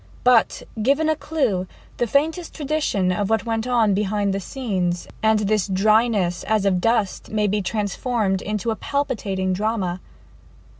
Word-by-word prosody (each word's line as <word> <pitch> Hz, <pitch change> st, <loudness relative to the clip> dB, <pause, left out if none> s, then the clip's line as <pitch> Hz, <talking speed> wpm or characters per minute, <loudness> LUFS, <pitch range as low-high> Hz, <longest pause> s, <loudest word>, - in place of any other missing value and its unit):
But 250 Hz, -2 st, +3 dB, 0.2 s
given 285 Hz, +7 st, +2 dB
a 315 Hz, -, +2 dB
clue 260 Hz, -, -1 dB, 0.3 s
the 240 Hz, -, 0 dB
faintest 315 Hz, -, 0 dB
tradition 290 Hz, -, 0 dB
of 200 Hz, +2 st, -1 dB
what 225 Hz, 0 st, +1 dB
went 225 Hz, 0 st, -1 dB
on 230 Hz, -5 st, +3 dB
behind 200 Hz, 0 st, 0 dB
the 195 Hz, -, -1 dB
scenes, 185 Hz, -6 st, -2 dB
and 220 Hz, -1 st, +3 dB
this 210 Hz, -1 st, +1 dB
dryness 205 Hz, -2 st, +2 dB
as 215 Hz, -2 st, +1 dB
of 185 Hz, -2 st, +2 dB
dust 225 Hz, -3 st, 0 dB
may 210 Hz, -1 st, 0 dB
be 205 Hz, +1 st, +1 dB
transformed 205 Hz, 0 st, -1 dB
into 210 Hz, +2 st, -2 dB
a -, -, -1 dB
palpitating 200 Hz, -10 st, -2 dB
drama. 195 Hz, -3 st, -1 dB
215 Hz, 150 wpm, -22 LUFS, 195-240 Hz, 0.3 s, But